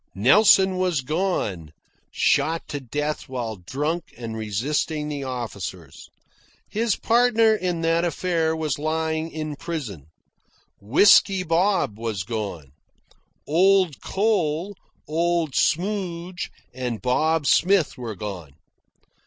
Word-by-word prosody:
Nelson 190 - +5
was 180 -6 +1
gone 130 - -2 0.4
shot 160 +4 +1
to 145 - -3
death 145 +4 -4
while 120 -4 -4
drunk 150 - -3
and 115 -2 -6
resisting 140 +8 -2
the 145 -2 -4
officers. 100 - -6 0.6
His 225 -1 0
partner 230 -1 +3
in 180 -5 -2
that 165 +1 +2
affair 170 -2 0
was 155 -3 -2
lying 160 +1 -1
in 155 -2 -5
prison. 125 - -6 0.7
Whisky 185 - +5
Bob 170 - +1
was 110 -4 -3
gone. 100 - -5 0.7
Old 185 0 +3
Cole, 190 -3 0 0.3
Old 165 -1 0
Smoudge, 180 0 -1 0.2
and 125 -3 -4
Bob 155 +5 +1
Smith 185 +2 +3
were 115 -4 -6
gone. 90 -7 -7
155 Hz, 105 wpm, -23 LUFS, 120-180 Hz, 0.7 s, Nelson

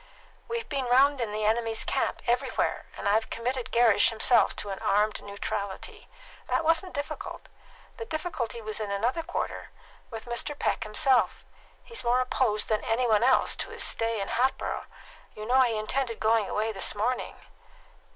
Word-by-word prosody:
"We've 465 0 -3
been 275 -3 -2
round 265 +2 +4
in 225 -3 -2
the 215 0 -2
enemy's 225 0 +1
camp, - - -1
everywhere; 240 +1 0
and - - -3
I've 215 +2 +2
committed 245 +2 -3
Gerrish 230 -3 +5
himself 230 +2 +3
to 205 - -4
an 195 - -5
armed 210 +1 +1
neutrality. 200 -1 -5 0.4
That - - +1
wasn't 330 +3 +2
difficult. 285 0 -5 0.5
The 460 - -5
difficulty 310 - -3
was 215 0 -3
in 215 -2 -3
another 230 +10 0
quarter 350 +2 -4 0.4
with 225 -2 -7
Mr. 240 +4 -2
Peck - - 0
himself. 255 +4 +2 0.4
He's 465 -2 -5
more 245 +1 +3
opposed 250 -4 +1
than 215 -1 0
any 240 +3 +1
one 215 -2 +4
else 255 +2 +4
to - - -3
his - - -4
stay 225 -1 0
in 195 - -3
Hatboro'. 260 +2 0 0.5
You 215 - -7
know 255 +3 +4
he 235 -4 +2
intended 230 +2 -2
going 220 -2 +2
away 220 +1 0
this 195 0 -1
morning?" 240 +5 -1
235 Hz, 165 wpm, -28 LUFS, 215-260 Hz, 0.5 s, Gerrish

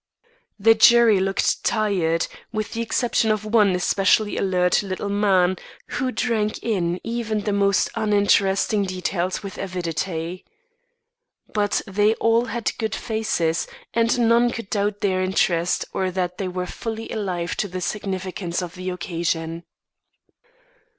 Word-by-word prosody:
The 225 +2 +6
jury 225 -2 +6
looked 195 +1 0
tired, 185 -7 +1 0.3
with 215 -1 -3
the 230 - -2
exception 230 0 +1
of 215 0 0
one 210 -4 +3
especially 195 +3 +2
alert 180 -2 +2
little 195 0 -4
man 190 -3 +2 0.3
who 260 -1 -1
drank 220 -4 -1
in 180 -6 0
even 225 -2 -2
the 205 0 -1
most 200 -1 +2
uninteresting 205 -1 +2
details 185 0 -2
with 195 -1 -7
avidity. 175 -1 -3 1.1
But 205 -1 +1
they 205 +3 +2
all 230 +1 +2
had 235 -2 -2
good 220 -2 -1
faces, 215 -8 -1 0.3
and 230 +1 +2
none 235 +1 +4
could 230 -4 -7
doubt 205 0 -1
their 185 -2 +1
interest, 180 -2 +1
or 190 -1 0
that 180 0 -3
they 195 - -2
were 180 0 -3
fully 225 +4 -5
alive 180 -5 -2
to 205 - -1
the 185 -1 -5
significance 185 -2 -3
of 175 -1 -7
the 185 0 -5
occasion. 170 -2 -3
200 Hz, 135 wpm, -23 LUFS, 180-220 Hz, 1.1 s, The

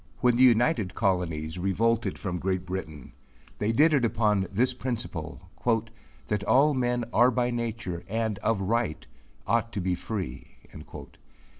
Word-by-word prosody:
When 125 -1 +3
the 125 - +2
united 120 - +4
colonies 90 -5 -1
revolted 115 +5 +1
from 90 -3 -4
Great 95 0 -1
Britain, 80 -7 -6 0.5
they 105 +2 +1
did 150 +7 +4
it 140 -4 +3
upon 105 -4 +1
this 125 +6 +1
principle, 95 -10 -5 0.7
"that 105 -1 -2
all 135 +7 +4
men 125 -2 0
are 120 +2 +6
by 125 0 0
nature 115 -7 -4
and 110 -1 -2
of 115 -3 0
right 110 -3 -1 0.4
ought 115 0 +1
to - - -2
be 90 0 0
free." 90 - -5
110 Hz, 140 wpm, -27 LUFS, 95-120 Hz, 0.7 s, are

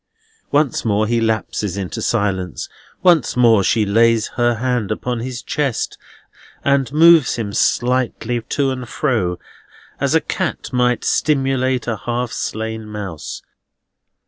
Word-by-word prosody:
Once 145 -3 +1
more 110 -1 +1
he 115 +1 0
lapses 110 -3 -1
into 95 -3 -4
silence. 95 -6 -1 0.4
Once 175 -8 +3
more 115 -5 +5
she 110 +2 +2
lays 115 +2 +3
her 120 -1 +1
hand 120 -3 -1
upon 125 -1 -2
his 125 +1 -5
chest, 140 -6 -2 0.7
and 140 -1 +2
moves 160 -1 +6
him 105 -4 -4
slightly 120 -1 0
to 135 +3 -1
and 125 -2 -6
fro, 110 - 0 0.6
as - - +1
a - - +6
cat - - -4
might 125 -1 +1
stimulate 135 -3 +1
a 115 -2 -2
half 120 0 -1
slain 110 0 -4
mouse. 100 -7 -6
120 Hz, 130 wpm, -19 LUFS, 110-130 Hz, 0.7 s, moves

